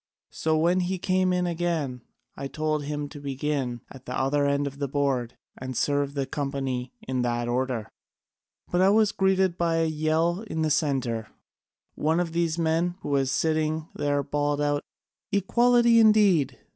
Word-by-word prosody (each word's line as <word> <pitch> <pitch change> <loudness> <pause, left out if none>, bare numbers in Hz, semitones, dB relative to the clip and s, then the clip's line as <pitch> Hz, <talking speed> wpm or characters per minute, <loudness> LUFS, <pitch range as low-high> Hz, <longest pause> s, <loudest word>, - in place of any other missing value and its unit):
So 160 0 0
when 170 +3 +3
he 185 +1 -1
came 185 0 +1
in 180 0 +1
again, 165 -7 -2 0.3
I 140 - -5
told 155 0 -2
him 145 0 -3
to 145 - -10
begin 135 -3 -2
at 130 -1 -13
the - - -3
other 140 +2 +1
end 140 0 +1
of 140 0 -6
the 140 - -1
board, 135 -4 -1 0.2
and 130 -1 -6
serve 145 0 0
the 140 -1 -1
company 135 -3 -3
in 130 -1 -2
that 120 -1 -1
order. 125 -3 -1 0.8
But 175 - +2
I 190 - +5
was 215 0 +4
greeted 190 -2 +1
by 170 -1 +1
a 165 0 +2
yell 160 +4 0
from 160 -5 -2
the 155 - +1
centre: 130 -7 0 0.7
one 160 +3 +1
of 175 -2 -1
these 165 -1 0
men 165 +2 +1
who - - -5
was 135 -2 +1
sitting 155 +1 0
there 145 -1 0
bawled 145 +1 -1
out, 145 0 +1 0.5
'Equality 235 +4 +4
indeed! 210 - +4
150 Hz, 170 wpm, -26 LUFS, 140-175 Hz, 0.8 s, I